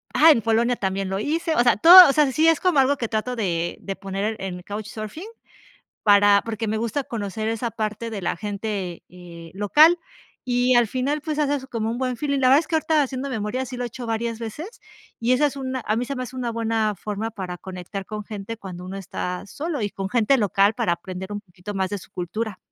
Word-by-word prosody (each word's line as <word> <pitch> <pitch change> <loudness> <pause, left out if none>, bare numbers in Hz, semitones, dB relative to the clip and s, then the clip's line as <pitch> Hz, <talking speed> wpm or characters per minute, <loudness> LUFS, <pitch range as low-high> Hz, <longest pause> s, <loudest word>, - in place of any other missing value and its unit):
Ah, 325 +1 +8
en 235 - +3
Polonia 230 +2 +2
también 195 0 -2
lo 190 0 -2
hice, 320 - -1
o - - +4
sea, 240 -4 +4
todo, 350 - +10
o - - +2
sea, 295 -2 +3
sí 315 +5 +3
es 325 -2 +4
como 360 -6 +2
algo 275 +2 +3
que 235 - -2
trato 220 +3 -2
de 175 -6 -2
de 195 - -5
poner 200 +3 -3
en 190 -2 -4
en 180 - -9
Couchsurfing 215 - -7 0.8
para 205 -1 +6
porque 225 -1 -3
me 215 +1 -1
gusta 230 +5 -2
conocer 215 -2 -4
esa 230 +1 -2
parte 215 +1 -3
de 215 -3 -5
la 170 - -1
gente, 200 -3 -4
eh, 170 -2 -12
local, 300 - +5 0.5
y 245 +1 +2
al 240 -1 +5
final, 270 +6 -1
pues, 305 0 -3
haces 285 -2 0
como 225 -4 -2
un 235 - -3
buen 255 -1 -2
feeling. 280 +2 -1
La 255 -1 +4
verdad 275 +3 +7
es 325 - -5
que 325 - -1
ahorita 315 -1 +2
haciendo 270 0 -3
memoria 225 +3 -2
sí 255 0 -7
lo 245 - -3
he - - -2
hecho 240 +1 -8
varias 230 0 -2
veces, 300 - -7 0.4
y 235 +2 +1
esa 295 +4 +3
es 280 - -6
una 260 -1 -3
a 215 - +2
mí 240 +2 -1
se 275 - -4
me 255 - -4
hace 250 +1 -9
una 245 -2 -2
buena 225 -2 0
forma 210 +4 -4
para 185 -4 -6
conectar 190 +1 -7
con 215 +1 -6
gente 210 +1 -7
cuando 180 -4 -9
uno 190 +2 -6
está 180 -1 -5
solo, 300 - -4
y 205 - -1
con 195 -1 -5
gente 240 +4 +3
local 205 -1 +2
para 175 - +1
aprender 185 +3 -7
un 205 - -5
poquito 180 +1 -10
más 190 -1 -1
de 205 - -3
su 185 - -14
cultura. 195 +3 -4
225 Hz, 235 wpm, -23 LUFS, 200-260 Hz, 0.8 s, todo